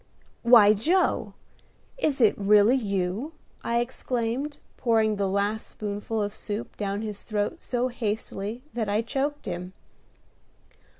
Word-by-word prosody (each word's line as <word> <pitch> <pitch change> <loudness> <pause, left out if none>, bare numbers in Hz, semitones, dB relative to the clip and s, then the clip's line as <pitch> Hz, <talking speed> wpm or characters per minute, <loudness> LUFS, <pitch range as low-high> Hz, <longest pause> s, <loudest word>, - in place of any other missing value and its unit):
"Why, 230 -4 +7
Joe! 335 - +1 0.6
is 305 - 0
it 220 - +5
really 205 +3 +5
you?" 200 - -2 0.3
I 235 0 +1
exclaimed, 250 +3 -2 0.2
pouring 220 -3 +2
the 200 -1 0
last 200 +3 -1
spoonful 210 +1 -3
of 205 0 -3
soup 215 0 -5
down 205 0 -2
his 210 -2 -5
throat 215 +9 -2
so 250 0 -1
hastily 220 -1 -4
that 225 -3 -2
I 210 +3 +1
choked 280 +5 -2
him. 180 +1 -5
220 Hz, 125 wpm, -26 LUFS, 205-245 Hz, 0.6 s, Why